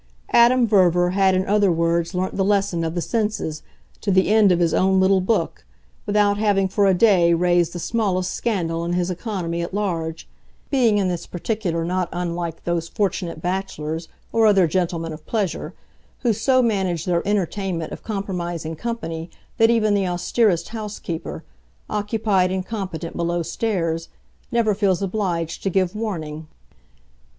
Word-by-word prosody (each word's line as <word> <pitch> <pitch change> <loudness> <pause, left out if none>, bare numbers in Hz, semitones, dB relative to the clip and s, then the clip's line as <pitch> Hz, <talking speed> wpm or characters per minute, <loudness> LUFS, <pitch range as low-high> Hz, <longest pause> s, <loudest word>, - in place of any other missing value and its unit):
Adam 240 +1 +5
Verver 180 -4 +3
had 190 0 +3
in 185 +1 +1
other 205 -2 +3
words 170 +1 0
learnt 185 +1 -1
the 195 - +1
lesson 195 -4 +1
of 165 +1 -3
the 175 - 0
senses, 210 -9 -2 0.4
to 210 - -2
the 190 0 +3
end 215 -2 +5
of 175 - +3
his 170 -2 +1
own 190 0 +3
little 190 0 +4
book, 185 -3 -1 0.4
without 205 0 +2
having, 200 -3 +2
for 200 +1 +2
a 190 - +5
day, 175 -5 +4
raised 175 -1 +2
the 175 - -6
smallest 185 -2 -1
scandal 170 -8 -1
in 170 +1 -2
his 180 0 0
economy 180 -3 -3
at 170 +3 -4
large; 165 -6 -2 0.4
being 240 -6 +3
in 195 -2 +1
this 175 -2 -3
particular 175 -3 -2
not 180 +1 -1
unlike 170 -1 -4
those 170 -1 -1
fortunate 185 -5 -2
bachelors, 170 -3 -3 0.3
or 225 -1 +4
other 195 -3 +5
gentlemen 165 -1 -1
of 155 0 -10
pleasure, 205 -7 -2 0.5
who 240 -3 +2
so 255 +4 +2
manage 190 -7 0
their 175 -2 +1
entertainment 190 -4 -1
of - - -8
compromising 175 -6 -4
company 165 -5 -4 0.3
that 225 0 +6
even 220 -3 +3
the 195 -2 +1
austerest 175 +1 +1
housekeeper, 210 -7 -6 0.5
occupied 210 -3 +1
and 190 -1 -2
competent 185 -6 -5
below 170 0 -1
stairs, 165 -2 -2 0.4
never 230 -3 +2
feels 200 -2 +1
obliged 180 -4 -2
to 195 - 0
give 185 0 0
warning. 160 -8 -4
185 Hz, 160 wpm, -22 LUFS, 170-205 Hz, 0.5 s, that